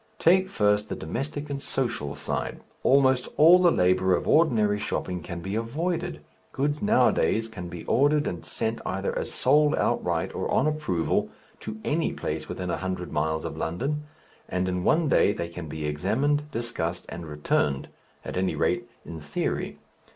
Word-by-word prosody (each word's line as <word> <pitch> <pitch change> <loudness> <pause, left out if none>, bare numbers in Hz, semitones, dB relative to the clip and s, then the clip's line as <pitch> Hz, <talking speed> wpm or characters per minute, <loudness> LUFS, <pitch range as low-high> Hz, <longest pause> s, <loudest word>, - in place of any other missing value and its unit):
Take 185 +1 +4
first 105 - +2
the - - -2
domestic 140 - -4
and 140 -1 -3
social 120 - -2
side; - - -3 0.2
almost 130 -2 +4
all 170 +4 +8
the 180 - +6
labour 95 - +3
of - - -3
ordinary 110 -10 +3
shopping 90 -3 -3
can 85 -1 -6
be 95 +3 -4
avoided 165 +10 -2 0.3
goods 145 +2 -1
nowadays 205 - +3
can 90 -6 -7
be 85 -1 -8
ordered 145 +3 +3
and 85 - -4
sent 115 0 -2
either 95 +1 -2
as - - -3
sold 150 +3 +3
outright, - - 0
or - - -3
on 130 - +2
approval, 150 - 0 0.3
to 110 0 -7
any 160 +2 0
place - - -4
within 90 -1 -3
a - - -1
hundred 95 -1 -4
miles 80 +1 -1
of - - -4
London, 140 - -2 0.4
and 90 0 0
in 90 -1 -1
one 160 - +3
day 105 - +4
they 85 -4 -4
can 85 -1 -7
be 75 0 -5
examined, 130 - 0
discussed, 115 - -3
and 85 -1 -7
returned 75 -2 0 0.4
at - - -4
any 95 0 0
rate, - - 0 0.2
in 80 -1 -7
theory. 75 -1 -3
110 Hz, 165 wpm, -26 LUFS, 90-145 Hz, 0.4 s, all